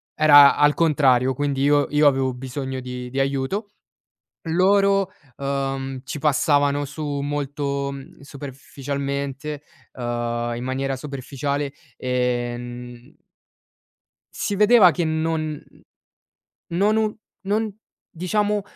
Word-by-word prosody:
era 145 -2 +8
al 145 0 +5
contrario, 135 -6 +3
quindi 140 0 -1
io 145 0 +4
io 150 0 +4
avevo 135 -2 +2
bisogno 130 +1 -5
di 125 -1 -6
di 135 - -2
aiuto, 135 +10 -1 0.8
loro, 195 +2 +3 0.3
uhm, 135 -1 -3
ci 140 - -5
passavano 145 0 +2
su 155 +3 -6 0.2
molto, 140 -1 -2
mhmm, 135 -1 -11
superficialmente, 140 +1 -5 0.3
uhm, 120 -1 -3
in 120 - -5
maniera 135 +1 -2
superficiale 140 +1 -4 0.3
e 125 -1 -1
n 120 +3 -10 1.2
Si 205 - -2
vedeva 210 -2 +7
che 170 +1 -1
non 160 0 0
mhmm, 155 -1 -8 1.0
non 205 +3 +3
u 215 -1 0 0.3
non 210 0 0 0.3
diciamo, 205 +4 -1
140 Hz, 110 wpm, -23 LUFS, 130-155 Hz, 1.2 s, era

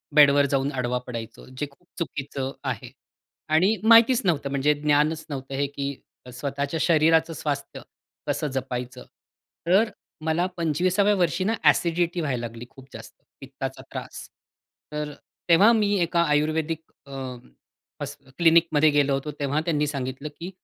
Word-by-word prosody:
बेडवर 145 -1 +7
जाऊन 135 +1 +1
आडवा 125 -2 -1
पडायचो, 115 -2 -7
जे 130 +3 -5
खूप 175 +5 -28
चुकीचं 135 -4 -4
आहे 130 -2 -4 0.6
आणि 185 +7 +4
माहितीच 230 +2 +6
नव्हतं 150 -6 +1
म्हणजे 140 +2 +2
ज्ञानच 150 +2 +1
नव्हतं 135 -1 -5
हे, 140 +1 0
की 140 0 -4 0.4
स्वतःच्या 140 +4 -3
शरीराचं 165 0 +3
स्वास्थ्य 145 -2 -4 0.5
कसं 150 - -1
जपायचं. 125 -1 -5 0.6
तर 200 +6 +4 0.4
मला 160 +2 +1
25व्या 180 +5 +2
वर्षी 180 0 +1
ना 215 +4 +1
अ‍ॅसिडिटी 170 0 +2
व्हायला 135 -6 -2
लागली 115 +1 -10
खूप 135 -1 -15
जास्त, 115 0 -10 0.3
पित्ताचा 135 0 -6
त्रास. - - -7 0.6
तर 150 -1 -4 0.4
तेव्हा 195 +7 +7
मी 210 -2 +2
एका 170 0 +2
आयुर्वेदिक 155 +2 0 0.3
अ, 140 - -14 0.9
हॉ - - -1 0.3
क्लिनिकमध्ये 165 -2 +5
गेलो 145 -1 +2
होतो, 135 +2 -2
तेव्हा 145 +1 0
त्यांनी 150 -3 +1
सांगितलं, 135 +1 -4
की 175 - -5
150 Hz, 135 wpm, -25 LUFS, 135-165 Hz, 0.9 s, बेडवर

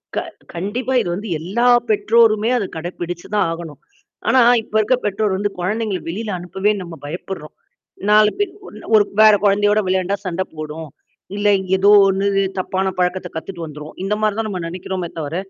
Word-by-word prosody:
க - - +1 0.3
கண்டிப்பா. 225 +9 -3
இது 175 - -3
வந்து 210 +1 -6
எல்லா 215 +9 0 0.2
பெற்றோருமே 215 +1 +3
அத 205 - -1
கடைபிடிச்சு 175 +1 -6
தான் 205 - +2
ஆகணும். 165 -3 -7 0.5
ஆனா, 260 - +5 0.2
இப்ப 215 - -12
இருக்க 255 +4 +2
பெற்றோர் 205 -1 0
வந்து 205 +1 -1
குழந்தைங்கள 210 +1 -1
வெளில 215 +5 -4
அனுப்பவே 190 +4 0
நம்ம 170 -2 -8
பயப்படுறோம். 160 0 -7 0.5
4 210 0 +6
பேர் 410 -2 -1 0.4
ஒரு 210 - +6 0.2
வேற 215 -1 +8
குழந்தையோட 205 +1 +3
விளையாண்டா 185 +1 +1
சண்ட 185 +1 -1
போடும். 155 0 -7 0.5
இல்ல 205 0 0
இங் 190 -1 -6
ஏதோ 195 +2 +4 0.2
ஒண்ணு 195 +1 +1 0.3
தப்பான 190 +1 -1
பழக்கத்த 180 0 0
கத்துட்டு 170 +1 -6
வந்துரும். 150 0 -9
இந்த 195 +2 0
மாரி 215 -1 +1
தான் 225 - -1
நம்ம 185 -3 -4
நினைக்கிறோமே 180 0 -5
தவிர, 150 +1 -4
190 Hz, 165 wpm, -19 LUFS, 175-210 Hz, 0.5 s, வேற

